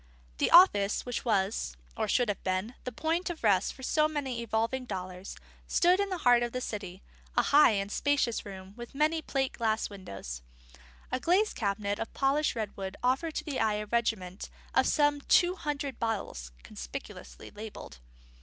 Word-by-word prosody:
The - - +3
office 210 - +6
which 245 -1 -3
was 195 - 0 0.2
(or - - -1
should 245 - +2
have 205 -2 -3
been) 185 +5 -1
the 250 - -3
point 325 +8 -1
of 335 -6 -6
rest 200 -4 +3
for 265 - -13
so 305 +3 +3
many 270 -6 -3
evolving 230 +3 -1
dollars 185 -2 -6 0.3
stood 360 +2 +4
in 400 0 +1
the 370 - -2
heart 245 -1 +6
of 240 -1 -2
the 255 - -1
city: 200 -6 -6 0.3
a - - +5
high 285 -5 +6
and 200 0 -2
spacious 285 -4 +1
room, 190 -1 -9
with 240 +2 -10
many 310 +3 +2
plate 270 -3 -1
glass 220 -2 -1
windows. 95 - -7 0.7
A - - 0
glazed 375 +9 +2
cabinet 200 -1 -1
of - - -4
polished 280 +2 +2
redwood 200 -3 -4
offered 270 +6 +1
to - - -2
the 295 -4 -3
eye 215 -1 +2
a 210 0 -3
regiment 210 -4 -2 0.2
of - - +4
some 290 -1 +2
two 355 +5 +4
hundred 285 -6 -4
bottles, 200 - -3
conspicuously - - -9
labelled. 205 - -9
230 Hz, 175 wpm, -30 LUFS, 200-290 Hz, 0.7 s, office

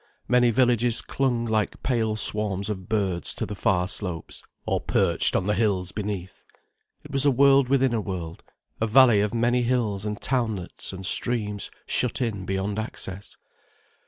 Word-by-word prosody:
Many 125 -1 +4
villages 120 -1 +2
clung 125 -3 -1
like 110 -2 -1
pale 115 -4 0
swarms 105 -2 0
of 95 -1 -5
birds 95 -6 -1
to - - -2
the 105 - -6
far 90 -3 +1
slopes, 90 -4 -4 0.2
or - - -1
perched - - +2
on 95 - +1
the 105 - +1
hills 100 -3 0
beneath. 100 -3 -5 0.6
It 150 - -12
was 135 -1 +2
a 145 - +5
world 135 0 +4
within 135 -2 +2
a 115 - 0
world, 90 -5 -6 0.4
a 110 - +2
valley 120 -2 +6
of 105 0 0
many 120 +1 +1
hills 115 -5 0
and 105 -1 -4
townlets 110 -8 -2
and 95 0 -7
streams 105 -2 0 0.2
shut 125 0 +1
in 110 -7 -2
beyond 95 +2 -2
access. 100 -3 -7
110 Hz, 160 wpm, -25 LUFS, 100-120 Hz, 0.6 s, valley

